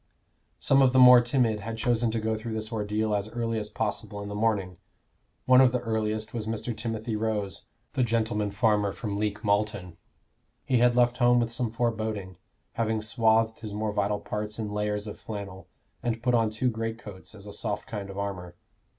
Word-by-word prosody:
Some 135 0 +4
of 130 -1 +4
the - - +3
more 125 -1 +9
timid 120 -3 +1
had 115 +2 -5
chosen 120 0 +1
to 115 +1 -1
go 110 0 -1
through 110 +1 -5
this 110 +1 -4
ordeal 105 0 -1
as 100 +1 -1
early 115 -1 -2
as 105 0 -6
possible 105 -1 -3
in 100 - -6
the - - -5
morning. 105 -4 0 0.7
One 130 0 +7
of 130 -2 +6
the 125 - 0
earliest 110 -2 -2
was 110 -2 -3
Mr. 115 +1 -3
Timothy 110 0 -3
Rose, 105 -3 -2 0.3
the 130 - 0
gentleman 110 -3 0
farmer 105 -1 +2
from 105 -3 -4
Leek 105 +1 -2
Malton. 100 -4 0 0.7
He 125 - +2
had 120 0 +4
left 120 0 +3
home 120 0 +5
with 115 -1 0
some 120 0 -2
foreboding, 110 -5 -2 0.3
having 110 -1 0
swathed 110 0 +2
his 105 -2 -6
more 105 0 -1
vital 105 0 0
parts 105 0 -4
in 110 -2 -3
layers 105 0 -1
of 105 - -8
flannel, 100 -3 -7 0.3
and 115 -1 -2
put 125 0 +2
on 115 -2 +3
two 115 +4 0
greatcoats 110 -3 -6
as 100 -1 -12
a 105 - -8
soft 105 - -3
kind 100 -3 -5
of 95 - -8
armor. 90 -3 -4
110 Hz, 195 wpm, -27 LUFS, 105-115 Hz, 0.7 s, more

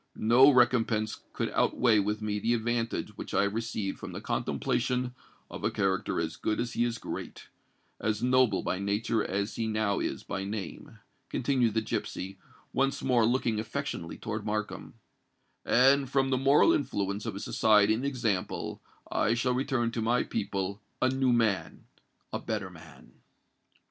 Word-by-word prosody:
No 120 +5 +6
recompense 120 -4 +2
could - - -2
outweigh 115 -4 +3
with 105 +2 -1
me 105 -1 -1
the 115 +3 +1
advantage 115 -2 -2
which - - -6
I 100 - +4
have 100 0 0
received 110 -3 -3
from - - -7
the - - -5
contemplation 125 +1 -1 0.3
of - - -9
a - - +2
character 95 -3 0
as 80 0 -3
good 110 - -1
as 120 0 -2
he 120 - +1
is 120 -1 -1
great—as 110 0 -6
noble 125 -5 +3
by 90 - -1
nature 105 +2 0
as 100 +3 -2
he 115 - -1
now 110 -2 0
is - - -3
by 95 - -4
name," 100 0 -6 0.3
continued 125 -4 +1
the 110 - +3
gipsy, 95 -3 -4 0.3
once 135 +1 0
more 120 -4 +3
looking 120 -3 +1
affectionately 115 - -4
towards 110 -1 -4
Markham;—"and, 115 +5 -1
from 135 0 +1
the - - +3
moral 140 - +5
influence 100 - -1
of 105 - -3
his 100 - -5
society 105 -1 +4
and 115 +4 -2
example, 115 -9 -2 0.3
I 115 - +2
shall 125 +1 +1
return 125 -2 0
to 115 - -3
my 120 +3 +2
people 100 +1 -3 0.2
a 130 - +3
new 130 -1 +2
man—a 115 -5 -2
better - - -3
man!" - - -15
115 Hz, 155 wpm, -29 LUFS, 105-125 Hz, 0.3 s, No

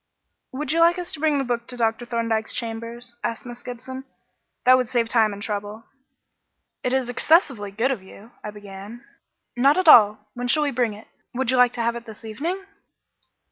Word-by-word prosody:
"Would 280 +1 -3
you 330 - +1
like 340 +2 +5
us 355 -1 -4
to 310 - -6
bring 305 -1 +2
the 275 - 0
book 240 -2 -3
to 250 - -7
Dr. 225 +1 0
Thorndyke's 230 -2 -1
chambers?" 230 +1 -5
asked 230 - -3
Miss 245 0 -9
Gibson. 255 +2 -7 0.6
"That 255 +1 +8
would 250 -3 -1
save 235 -2 +1
time 220 -3 +3
and 205 0 -7
trouble." 210 +1 -4 1.0
"It 250 - 0
is 260 -1 +1
excessively 250 - +2
good 230 +7 0
of 245 -7 -3
you 200 +4 -15
" - - -33
I 210 - -5
began. 205 +2 -10 0.5
"Not 275 +5 +4
at 370 -2 +1
all. 210 -6 +7
When 245 0 -4
shall 300 +5 +3
we 290 - 0
bring 235 -4 0
it? 210 - -14 0.3
Would 260 -1 +1
you 260 - +2
like 250 -1 +5
to 235 - -2
have 235 +1 0
it 235 0 -8
this 220 0 -11
evening?" 330 - -4
240 Hz, 205 wpm, -23 LUFS, 220-260 Hz, 1.0 s, That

